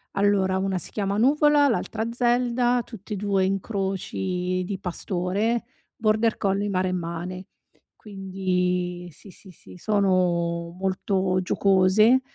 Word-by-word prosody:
Allora 195 Hz, -2 st, +2 dB
una 190 Hz, 0 st, -1 dB
si 175 Hz, -, -3 dB
chiama 200 Hz, -1 st, -2 dB
Nuvola, 290 Hz, +4 st, +4 dB
l'altra 225 Hz, -2 st, -2 dB
Zelda, 245 Hz, 0 st, +1 dB
tutti 215 Hz, -2 st, -9 dB
e -, -, -1 dB
2 195 Hz, -1 st, +1 dB
incroci 190 Hz, -2 st, -2 dB
di 195 Hz, 0 st, -4 dB
pastore, 190 Hz, +5 st, -1 dB, 0.3 s
border 220 Hz, 0 st, +1 dB
collie, 200 Hz, +1 st, 0 dB
maremmane. 185 Hz, -1 st, -3 dB, 0.5 s
Quindi 180 Hz, -3 st, -2 dB
sì, 195 Hz, -, -15 dB
sì, 190 Hz, +1 st, -15 dB
sì, 180 Hz, -, -15 dB
sono 175 Hz, -4 st, 0 dB
molto 190 Hz, 0 st, 0 dB
giocose, 195 Hz, +6 st, +4 dB
195 Hz, 110 wpm, -24 LUFS, 185-215 Hz, 0.5 s, Nuvola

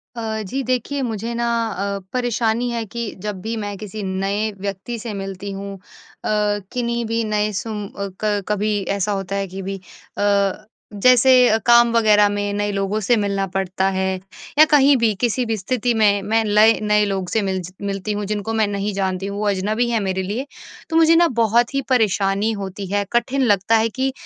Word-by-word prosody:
अ, 220 Hz, -1 st, -3 dB
जी 260 Hz, +8 st, -3 dB
देखिए 255 Hz, +3 st, -1 dB
मुझे 230 Hz, -2 st, -3 dB
ना 235 Hz, 0 st, -1 dB, 0.2 s
अ, 200 Hz, 0 st, -3 dB
परेशानी 240 Hz, -1 st, 0 dB
है 230 Hz, -1 st, -3 dB
कि 230 Hz, +1 st, -5 dB
जब 205 Hz, -3 st, -4 dB
भी 225 Hz, +3 st, -3 dB
मैं 205 Hz, -1 st, -4 dB
किसी 210 Hz, +1 st, -7 dB
नए 195 Hz, +3 st, -1 dB
व्यक्ति 200 Hz, +4 st, -5 dB
से 225 Hz, -1 st, -6 dB
मिलती 195 Hz, 0 st, -6 dB
हूँ 195 Hz, 0 st, -6 dB
अ, -, -, -14 dB, 0.9 s
किन्ही 235 Hz, -1 st, -1 dB
भी 230 Hz, +1 st, -1 dB
नए 215 Hz, -1 st, 0 dB
सूम 210 Hz, +1 st, -4 dB
अ, 200 Hz, 0 st, -5 dB, 0.2 s
क 205 Hz, -1 st, +1 dB
कभी 210 Hz, 0 st, 0 dB, 0.2 s
ऐसा 200 Hz, +1 st, -1 dB
होता 195 Hz, -1 st, -3 dB
है 195 Hz, 0 st, -2 dB
कि 190 Hz, +1 st, -7 dB
भी 195 Hz, +1 st, -5 dB, 0.4 s
अ, 200 Hz, -1 st, +1 dB, 0.3 s
जैसे 250 Hz, +5 st, +5 dB, 0.3 s
काम 235 Hz, 0 st, +6 dB
वग़ैरह 210 Hz, -3 st, +5 dB
में 205 Hz, 0 st, -2 dB
नए 205 Hz, 0 st, -1 dB
लोगों 195 Hz, +1 st, -1 dB
से 240 Hz, -, +5 dB
मिलना 200 Hz, -2 st, 0 dB
पड़ता 190 Hz, 0 st, 0 dB
है 190 Hz, 0 st, -1 dB, 0.5 s
या 310 Hz, -, +10 dB
कहीं 285 Hz, -1 st, +6 dB
भी 230 Hz, -3 st, +2 dB
किसी 245 Hz, +1 st, +1 dB
भी 225 Hz, -1 st, -1 dB
स्थिति 240 Hz, +4 st, -1 dB
में 205 Hz, -3 st, +3 dB
मैं 225 Hz, +3 st, +1 dB
लए 215 Hz, +2 st, +5 dB
नए 210 Hz, 0 st, +3 dB
लोग 190 Hz, -3 st, -2 dB
से 220 Hz, -, +1 dB
मिल 190 Hz, -2 st, -1 dB
ज़ 180 Hz, +1 st, -9 dB
मिलती 195 Hz, +1 st, -3 dB
हूँ 205 Hz, 0 st, -3 dB
जिनको 210 Hz, +2 st, -3 dB
मैं 220 Hz, -1 st, +2 dB
नहीं 200 Hz, 0 st, -2 dB
जानती 190 Hz, -1 st, -2 dB
हूँ, 200 Hz, 0 st, -5 dB
वो 210 Hz, -, -1 dB
अजनबी 210 Hz, +5 st, 0 dB
हैं 230 Hz, -1 st, +1 dB
मेरे 190 Hz, -2 st, -1 dB
लिए 215 Hz, +8 st, -3 dB, 0.4 s
तो 325 Hz, -, -2 dB
मुझे 330 Hz, 0 st, +6 dB
ना 340 Hz, +1 st, +5 dB, 0.2 s
बहुत 235 Hz, +4 st, +2 dB
ही 275 Hz, -, +1 dB
परेशानी 205 Hz, -3 st, +2 dB
होती 195 Hz, +1 st, -6 dB
है। 205 Hz, 0 st, +1 dB
कठिन 240 Hz, +3 st, +1 dB
लगता 210 Hz, -2 st, +3 dB
है 225 Hz, +1 st, +1 dB
कि 265 Hz, +4 st, -1 dB
210 Hz, 200 wpm, -20 LUFS, 200-230 Hz, 0.9 s, या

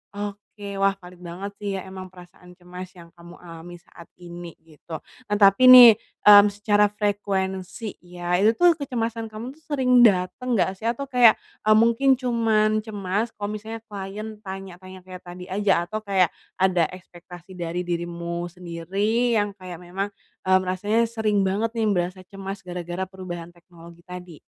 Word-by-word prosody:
Oke, 205 Hz, 0 st, -7 dB
wah 195 Hz, 0 st, +2 dB
valid 180 Hz, 0 st, -13 dB
banget 190 Hz, +4 st, -6 dB
sih 205 Hz, -1 st, -5 dB
ya, 190 Hz, -, -3 dB
memang 190 Hz, 0 st, -8 dB
perasaan 180 Hz, 0 st, -16 dB
cemas 180 Hz, +1 st, -10 dB
yang 170 Hz, -2 st, -15 dB
kamu 170 Hz, +1 st, -13 dB
alami 170 Hz, 0 st, -11 dB
saat 170 Hz, -, -16 dB, 0.2 s
ini 175 Hz, -1 st, -9 dB
gitu. 160 Hz, 0 st, -10 dB, 0.2 s
Nah 210 Hz, -1 st, -1 dB
tapi 195 Hz, +6 st, +6 dB
nih, 245 Hz, -4 st, +10 dB, 0.3 s
mmm, 205 Hz, 0 st, +10 dB
secara 205 Hz, 0 st, +2 dB
frekuensi, 200 Hz, 0 st, -3 dB
iya, 175 Hz, 0 st, -2 dB
itu 215 Hz, +4 st, +4 dB
tuh 345 Hz, +3 st, +4 dB
kecemasan 230 Hz, -5 st, -3 dB
kamu 230 Hz, +4 st, -6 dB
tuh 320 Hz, -, -26 dB
sering 250 Hz, -3 st, +5 dB
dateng 210 Hz, +6 st, +1 dB
enggak 190 Hz, -2 st, 0 dB
sih? 225 Hz, -, -10 dB
Atau 260 Hz, +4 st, -2 dB
kayak, 245 Hz, -4 st, +6 dB, 0.3 s
eee, 215 Hz, -, +6 dB
mungkin 235 Hz, +4 st, +4 dB
cuman 220 Hz, -3 st, +1 dB
cemas 205 Hz, +2 st, -3 dB
kalau 205 Hz, 0 st, -5 dB
misalnya 220 Hz, +1 st, -8 dB
klien 205 Hz, +2 st, -7 dB
tanya-tanya 190 Hz, -1 st, -9 dB
kayak 185 Hz, 0 st, -11 dB
tadi 180 Hz, +1 st, -10 dB
aja. 200 Hz, +1 st, 0 dB, 0.2 s
Atau 215 Hz, 0 st, -5 dB
kayak 190 Hz, -4 st, +2 dB, 0.3 s
ada 180 Hz, -3 st, +3 dB
ekspektasi 175 Hz, 0 st, -13 dB
dari 175 Hz, +1 st, -3 dB
dirimu 170 Hz, 0 st, -4 dB
sendiri 195 Hz, +7 st, -1 dB
yang 205 Hz, -2 st, 0 dB
kayak 180 Hz, -2 st, -9 dB
memang, 195 Hz, +3 st, -5 dB, 0.3 s
mmm, 185 Hz, 0 st, +4 dB
rasanya 205 Hz, +5 st, 0 dB
sering 215 Hz, -3 st, 0 dB
banget 205 Hz, +4 st, -1 dB
nih 220 Hz, -2 st, 0 dB
berasa 185 Hz, 0 st, -1 dB
cemas 195 Hz, 0 st, -7 dB
gara-gara 180 Hz, +1 st, -5 dB
perubahan 175 Hz, -3 st, -8 dB
teknologi 170 Hz, 0 st, -17 dB
tadi? 180 Hz, -3 st, -10 dB
195 Hz, 160 wpm, -23 LUFS, 180-215 Hz, 0.3 s, nih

